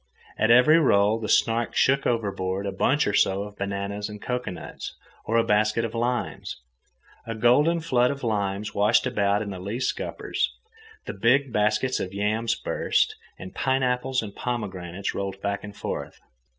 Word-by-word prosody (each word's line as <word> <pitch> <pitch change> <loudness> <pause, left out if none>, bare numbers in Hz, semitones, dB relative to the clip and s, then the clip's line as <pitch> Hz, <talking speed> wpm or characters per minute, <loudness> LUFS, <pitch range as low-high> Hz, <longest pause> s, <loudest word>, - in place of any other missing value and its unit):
At 110 - +1
every 125 +7 +7
roll 105 -6 +3
the 110 - -4
Snark 115 0 +2
shook 135 +1 +3
overboard 100 -4 -1
a 100 - -2
bunch 135 +9 +2
or 105 - 0
so 95 0 +2
of 105 0 -10
bananas 100 +1 -3
and 105 0 -8
cocoanuts, 125 -8 -5 0.3
or 115 - +1
a 115 - +4
basket 110 +2 +2
of 115 - -5
limes. 120 +1 -2 0.7
A 115 - -3
golden 145 +9 +3
flood 125 -6 +2
of 140 -1 -5
limes 105 -2 -1
washed 105 +5 +3
about 105 -4 +1
in 100 - -6
the 95 - -6
lee 100 +6 -4
scuppers. 130 - -2 0.5
The - - -5
big 125 +6 +2
baskets 105 +5 +1
of 95 +1 -5
yams 110 +3 0
burst, - - 0 0.2
and 95 - -9
pineapples 130 -1 0
and 100 -2 -8
pomegranates 95 -6 -4
rolled 100 -1 -4
back 100 0 -3
and 105 -1 -9
forth. - - -5
110 Hz, 165 wpm, -25 LUFS, 100-125 Hz, 0.7 s, every